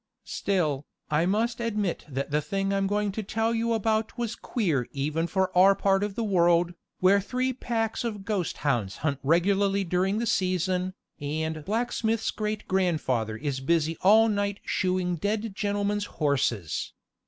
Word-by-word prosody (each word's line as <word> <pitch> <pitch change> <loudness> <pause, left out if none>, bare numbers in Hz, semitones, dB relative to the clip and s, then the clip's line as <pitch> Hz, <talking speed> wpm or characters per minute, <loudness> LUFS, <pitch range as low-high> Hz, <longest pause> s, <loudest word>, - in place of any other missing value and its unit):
Still, 155 -8 -1 0.2
I 155 +3 +2
must 225 +5 0
admit 210 -6 -1
that 140 +1 -3
the 150 +1 +2
thing 195 +3 -1
I'm 195 0 +1
going 205 0 0
to 220 - -3
tell 225 +3 0
you 230 0 0
about 220 +1 0
was 235 -2 -2
queer 165 - -1
even 150 +4 -1
for 190 0 0
our 195 +2 +7
part 195 0 +2
of 205 -1 -3
the 230 - -1
world, 175 -3 +3 0.3
where 195 +2 +5
three 255 +5 -1
packs 230 -3 -2
of 210 -4 -4
ghost 200 -6 -1
hounds 115 -9 0
hunt 140 -3 0
regularly 195 +6 +2
during 185 +3 0
the 235 - 0
season, 185 -2 0 0.2
and 155 +2 -3
blacksmith's 225 0 0
great 215 0 -3
grandfather 145 - 0
is 140 0 -3
busy 160 +3 +1
all 220 +4 +6
night 205 -1 -1
shoeing 185 -1 0
the 170 - -4
dead 210 +2 -2
gentlemen's 205 0 -1
horses. 130 - -1
195 Hz, 160 wpm, -27 LUFS, 165-215 Hz, 0.3 s, our